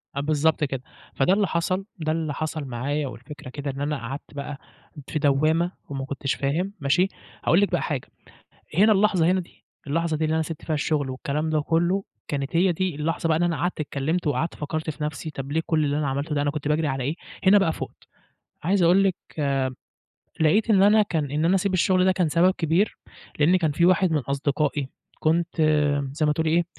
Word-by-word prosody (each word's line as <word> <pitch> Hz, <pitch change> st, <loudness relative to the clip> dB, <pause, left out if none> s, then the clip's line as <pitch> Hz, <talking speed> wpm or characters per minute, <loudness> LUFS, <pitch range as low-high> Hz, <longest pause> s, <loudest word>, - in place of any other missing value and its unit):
آه -, -, -1 dB
بالضبط 155 Hz, +2 st, +1 dB
كده. 135 Hz, -3 st, -2 dB, 0.3 s
فده 140 Hz, +7 st, +3 dB
اللي 200 Hz, -1 st, +2 dB
حصل، 185 Hz, +3 st, -1 dB
ده 155 Hz, 0 st, -1 dB
اللي 160 Hz, -2 st, -1 dB
حصل 155 Hz, 0 st, -3 dB
معايا 135 Hz, +4 st, -2 dB
والفكرة 130 Hz, +2 st, -10 dB
كده 140 Hz, +1 st, -4 dB
إن 135 Hz, +1 st, -7 dB
أنا 150 Hz, 0 st, -1 dB
قعدت 135 Hz, +5 st, -7 dB
بقى 145 Hz, 0 st, -5 dB, 0.5 s
في 155 Hz, -, -2 dB
دوامة 155 Hz, +4 st, +2 dB, 0.2 s
وما 135 Hz, -1 st, -4 dB
كنتش 140 Hz, 0 st, -2 dB
فاهم، 170 Hz, +9 st, -1 dB
ماشي، 160 Hz, +7 st, +2 dB, 0.4 s
هاقول 175 Hz, +5 st, +4 dB
لِك 205 Hz, -, +1 dB
بقى 175 Hz, -, +1 dB
حاجة، 140 Hz, -5 st, -3 dB, 0.7 s
هنا 215 Hz, +4 st, +6 dB
اللحظة 195 Hz, -4 st, +3 dB
هنا 185 Hz, +2 st, +3 dB
دي، 175 Hz, -, -15 dB, 0.2 s
اللحظة 160 Hz, +2 st, 0 dB
دي 160 Hz, -, -1 dB
اللي 155 Hz, +1 st, +1 dB
أنا 160 Hz, -, +2 dB
سِبت 160 Hz, -1 st, -7 dB
فيها 155 Hz, -, -1 dB
الشغل 145 Hz, -2 st, 0 dB
والكلام 145 Hz, +4 st, -2 dB
ده 155 Hz, -1 st, +2 dB
كله، 170 Hz, +5 st, +1 dB, 0.2 s
كانت 140 Hz, +2 st, -2 dB
هي 180 Hz, +1 st, +4 dB
دي 185 Hz, 0 st, -1 dB
اللحظة 165 Hz, +3 st, -1 dB
بقى 160 Hz, -, +3 dB
اللي 175 Hz, -, +2 dB
أنا 170 Hz, -1 st, 0 dB
قعدت 175 Hz, -2 st, -2 dB
اتكلمت 155 Hz, +4 st, -2 dB
وقعدت 155 Hz, +3 st, 0 dB
فكرت 155 Hz, +1 st, -3 dB
في 150 Hz, 0 st, -5 dB
نفْسي، 155 Hz, +1 st, -4 dB
طَب 135 Hz, -1 st, -6 dB
ليه 160 Hz, +1 st, +1 dB
كل 155 Hz, -2 st, +2 dB
اللي 145 Hz, +1 st, 0 dB
أنا 150 Hz, -, 0 dB
عملته 140 Hz, +3 st, -2 dB
ده، 145 Hz, -, +1 dB
أنا 145 Hz, -, +1 dB
كنت 145 Hz, 0 st, -4 dB
باجري 155 Hz, 0 st, +1 dB
على 135 Hz, -2 st, -2 dB
إيه، 150 Hz, +5 st, -2 dB, 0.3 s
هنا 200 Hz, +2 st, +8 dB
بقى 165 Hz, -5 st, +2 dB
فُقت، -, -, -8 dB, 0.5 s
عايز 185 Hz, +3 st, +2 dB
أقول 180 Hz, +4 st, +5 dB
لِك 190 Hz, -, +2 dB, 1.3 s
لقيت 205 Hz, +9 st, +3 dB
إن 195 Hz, -3 st, +5 dB
أنا 210 Hz, +2 st, +6 dB
كان 160 Hz, -8 st, -2 dB
إن 150 Hz, +2 st, 0 dB
أنا 180 Hz, +3 st, +4 dB
أسيب 190 Hz, 0 st, +1 dB
الشغل 185 Hz, +1 st, +3 dB
ده 190 Hz, -, +4 dB
كان 180 Hz, -4 st, +1 dB
سبب 170 Hz, +4 st, +4 dB
كبير، 170 Hz, +6 st, +1 dB, 0.4 s
لإن 165 Hz, +5 st, +5 dB
كان 160 Hz, -4 st, +1 dB
فيه 170 Hz, +4 st, +3 dB
واحد 185 Hz, -1 st, +3 dB
من 155 Hz, -, +3 dB
أصدقائي 140 Hz, +1 st, -1 dB, 0.3 s
كنت 165 Hz, +2 st, +1 dB, 0.6 s
زَي 155 Hz, +1 st, 0 dB
ما 150 Hz, -, +3 dB
تقولي 160 Hz, +1 st, 0 dB
إيه، 170 Hz, +2 st, +3 dB
155 Hz, 210 wpm, -24 LUFS, 145-175 Hz, 1.3 s, هنا